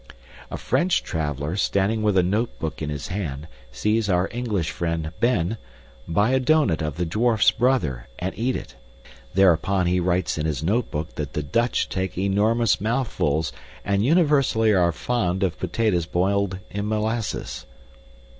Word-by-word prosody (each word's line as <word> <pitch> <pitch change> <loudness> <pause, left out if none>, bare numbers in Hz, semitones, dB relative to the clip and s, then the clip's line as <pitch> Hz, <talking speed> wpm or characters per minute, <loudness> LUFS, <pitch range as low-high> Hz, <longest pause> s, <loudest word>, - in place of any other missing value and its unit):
A - - -5
French 170 +8 +1
traveler, 75 -1 -3
standing 100 +2 +1
with 105 -3 +2
a 90 - +5
notebook 95 -5 -2
in 75 - -2
his 75 -2 -5
hand, 80 -6 -4 0.2
sees 105 - 0
our 90 0 +2
English 105 -9 -2
friend, 85 -2 -2
Ben, 115 -4 +1 0.5
buy 100 +8 +2
a 130 - +3
doughnut 130 - +2
of 75 0 -3
the 90 - 0
dwarf's 110 +6 +3
brother 90 - 0
and 95 +2 -3
eat 120 +6 -1
it. - - -7 0.6
Thereupon 95 0 +3
he 90 +1 +2
writes 90 -2 0
in 75 - 0
his 75 -1 -2
notebook 80 -5 -1
that 75 -2 -4
the 75 - -2
Dutch 115 - 0
take 95 -1 -3
enormous 105 +4 +2
mouthfuls 105 - 0 0.3
and 100 0 +1
universally 140 -7 +3
are 90 -3 +3
fond 95 0 -1
of 90 -4 -1
potatoes 90 -3 0
boiled 95 +2 0
in 100 +1 -3
molasses. 110 +1 -2
95 Hz, 150 wpm, -24 LUFS, 85-115 Hz, 0.6 s, a